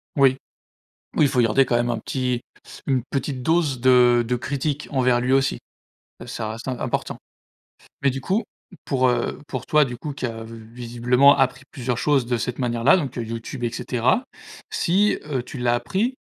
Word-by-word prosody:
Oui. 135 -2 +4 0.8
Oui 150 - +4
il - - +5
faut 130 -2 +2
garder 120 +4 +4
quand 120 - 0
même 120 0 +1
un 115 - -2
petit 125 +1 -2 0.5
une 130 -4 +1
petite 135 -1 -2
dose 160 -4 +1
de, 130 +2 +3 0.3
heu, - - -2
de 120 +2 -1
critiques 140 +4 -3
envers 125 -3 +2
lui 125 +1 0
aussi. 135 0 +2 0.7
Ça 115 -3 -4
reste 115 +4 -8
im 125 -2 -3
important. - - -2 0.8
Mais 140 - +3
du 135 +1 -4
coup 195 - 0 0.4
pour, 130 -2 +2
heu, 120 -1 -1
pour 130 -2 -5
toi 150 -1 +4
du 125 -2 -5
coup, 150 +5 -5
qui 135 - -4
a 115 -1 -5
vi 115 +1 -10 0.2
visiblement 125 +3 +3
appris 130 0 +1
plusieurs 125 -4 -3
choses 140 -3 +2
de 120 0 0
cette 120 +2 -4
manière-là, 120 +4 +3
donc 140 -8 -3
YouTube 115 +2 -5
et 120 - 0
cetera. 125 - 0 0.5
Si, 200 +5 +2
heu, 130 -4 -1
tu 135 - -9
l'as 120 -1 +2
appris, 215 - -1
125 Hz, 190 wpm, -23 LUFS, 120-140 Hz, 0.8 s, il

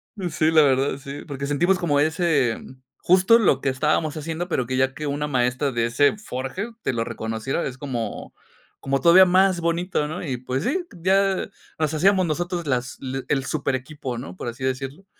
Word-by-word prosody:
Pues, 180 -6 -4
sí, 155 +1 +3
la 160 -1 +6
verdad, 135 0 +2
sí, 140 +1 -8
porque 140 -2 -5
sentimos 175 +7 +2
como 150 -6 +1
ese 155 -6 +1 0.4
justo 190 +6 +5
lo 140 - +3
que 140 - +1
estábamos 150 +3 0
haciendo, 165 +3 -4
pero 130 -7 0
que 130 - -2
ya 130 0 +1
que 150 +1 -5
una 145 +1 -2
maestra 130 +1 0
de 120 -2 0
ese 135 - +2
forje 185 - -5
te - - 0
lo 115 -1 -1
reconociera, 110 +6 -3
es 130 -1 -5
como, 125 -6 -5 0.5
como 135 0 0
todavía 180 +4 +7
más 185 0 +3
bonito, 170 -2 0
¿no?, 170 +4 -5
y 135 -4 -2
pues 130 +3 -3
sí, 355 +8 0 0.2
ya 195 +1 +2 0.3
nos 155 -1 0
hacíamos 185 +4 +3
nosotros 170 +1 -2
las 125 -2 -1
l 135 0 -4
el 135 -2 +1
súper 135 -2 -1
equipo, 130 -1 -5
¿no?, 90 -6 -7
por 95 - -7
así 120 +3 -8
decirlo. 135 +7 -4
145 Hz, 195 wpm, -23 LUFS, 130-175 Hz, 0.5 s, todavía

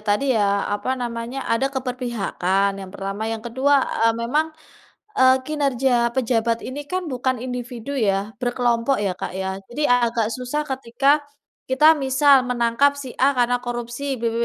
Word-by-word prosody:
tadi 205 +6 +2
ya 200 -3 +1
apa 255 +6 -2
namanya, 240 +1 -4
ada 265 +4 +1
keberpihakan 240 -7 -1
yang 190 - -8
pertama. 195 +2 -5
Yang 225 -1 -4
kedua, 275 +3 +3 0.3
eee, 230 - +3
memang, 255 +7 0 0.7
eee, 260 -6 +5
kinerja 265 -5 +1
pejabat 230 -2 0
ini 275 +3 -5
kan 370 -1 -2
bukan 255 -2 -1
individu 250 +1 -6
ya? 205 -4 0
Berkelompok 245 +1 +1
ya, 190 - 0
Kak, 180 - -6
ya? 190 0 -3
Jadi 295 +5 -1
agak 235 -3 +2
susah 260 +4 -3
ketika 270 +2 +1 0.5
kita 300 +5 +6
misal 270 -1 +4
menangkap 250 +3 +2
si 275 -2 -7
A 275 +2 +3
karena 245 0 +2
korupsi. 245 +3 -4
B - - -7
B - - -4
245 Hz, 155 wpm, -22 LUFS, 230-270 Hz, 0.7 s, kita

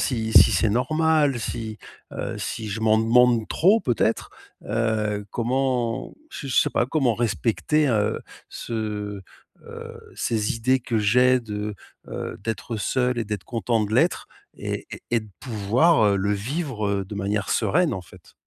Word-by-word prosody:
si 110 -4 -1
si - - +8
c'est 110 - +2
normal, 150 +3 +2
si, 110 0 -4 0.4
heu, - - -4
si 110 - -4
je 105 +2 -4
m'en 110 0 +4
demande 115 0 +4
trop 200 +7 +4
peut-être? 115 - 0 0.3
Heu, 105 -2 -1
comment, 125 0 -1 0.2
j 140 - -7
je - - -2
sais - - +4
pas 120 - +1
comment 135 -5 +1
respecter, 120 +6 +1
heu, 105 -4 +1 0.3
ce, 105 -3 -4 0.4
heu - - -9
ces 110 +2 -1
idées 130 +3 +2
que 120 -2 -2
j'ai 125 +4 +4
de, 105 -2 -5 0.3
heu, - - -5
d'être 115 +1 -3
seul 125 +3 0
et 115 - -1
d'être 105 -3 -4
content 115 0 -1
de 105 - -5
l'être - - +2 0.3
et - - -5
et - - -8
et 120 - +3
de 110 - -13
pouvoir, 115 +6 +2
heu, 100 -1 +3
le 100 +1 0
vivre 105 - -2
de 100 +2 -8
manière 100 0 -2
sereine 175 0 +2
en 95 - -4
fait. - - -18
115 Hz, 160 wpm, -24 LUFS, 105-125 Hz, 0.4 s, si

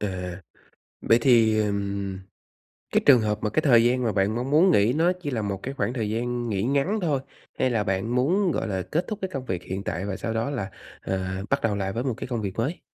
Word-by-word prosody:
À, 90 -3 -4 0.6
vậy 115 - +4
thì, 115 -4 +4
ừm, 100 -2 -2 0.7
cái - - +4
trường 130 -5 +8
hợp 105 -1 0
mà 105 - 0
cái 155 +9 +1
thời 120 -5 +5
gian 125 +1 +2
mà 110 -3 +1
bạn 100 +2 +1
mong 125 +3 -3
muốn 165 +6 +5
nghỉ 110 -4 +4
nó 165 +5 +3
chỉ 145 - -3
là 115 -4 -2
một 100 -2 -3
cái 135 +2 -5
khoảng 125 - -1
thời 110 -5 -2
gian 120 +1 -2
nghỉ 100 -2 -1
ngắn 140 - +1
thôi, 145 -6 +1 0.4
hay 130 - +2
là 110 -3 0
bạn 95 +4 -1
muốn, 175 +9 +2
gọi - - -2
là, 95 -2 -2
kết 155 - -1
thúc 215 - -4
cái 190 - -2
công 135 -2 -4
việc 90 -7 -3
hiện 95 +1 -5
tại 85 +4 -3
và 95 - -3
sau 115 - -3
đó 115 +5 -1
là, 105 -8 -3 0.3
à, 95 0 -3
bắt 140 0 +2
đầu 105 -3 +1
lại 95 -1 -2
với 120 +4 -3
một 130 -4 -1
cái - - -6
công 120 -3 -3
việc 95 -2 -4
mới? 140 +10 -2
115 Hz, 250 wpm, -25 LUFS, 100-135 Hz, 0.7 s, trường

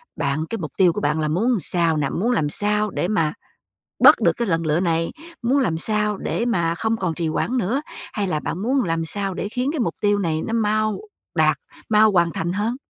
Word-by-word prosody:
bạn 155 +3 -1
cái 230 - -3
mục 155 -6 -5
tiêu 180 -3 +5
của - - -3
bạn 150 +2 0
là 155 - 0
muốn 220 +10 +1
sao 170 -2 0
nè? 140 -2 0
Muốn 230 +7 0
làm 150 -11 +1
sao 210 +4 0
để - - -1
mà 165 -7 +1 0.7
bớt - - +9
được - - +4
cái 235 -2 -1
lần 165 -2 0
lựa 155 +2 +2
này? 165 -2 0 0.3
Muốn 250 +4 +2
làm 170 -11 0
sao 210 +2 0
để 235 - -2
mà 170 -8 +1
không 220 +5 -1
còn 180 -4 -1
trì 170 -2 -2
hoãn 230 +10 -1
nữa? 245 +6 0 0.3
Hay 205 -2 -1
là 155 -4 -1
bạn 175 +4 -4
muốn 260 +3 +1
làm 165 -2 -1
sao 195 +2 -2
để 200 - -4
khiến 250 +4 -1
cái 315 - -3
mục 235 - 0
tiêu 205 -1 +2
này 160 -4 -1
nó 225 - -3
mau 215 - 0 0.3
đạt, - - +3 0.3
mau 215 0 +5
hoàn 170 -3 +3
thành 175 +2 -2
hơn? 215 +4 -1
195 Hz, 235 wpm, -22 LUFS, 165-220 Hz, 0.7 s, bớt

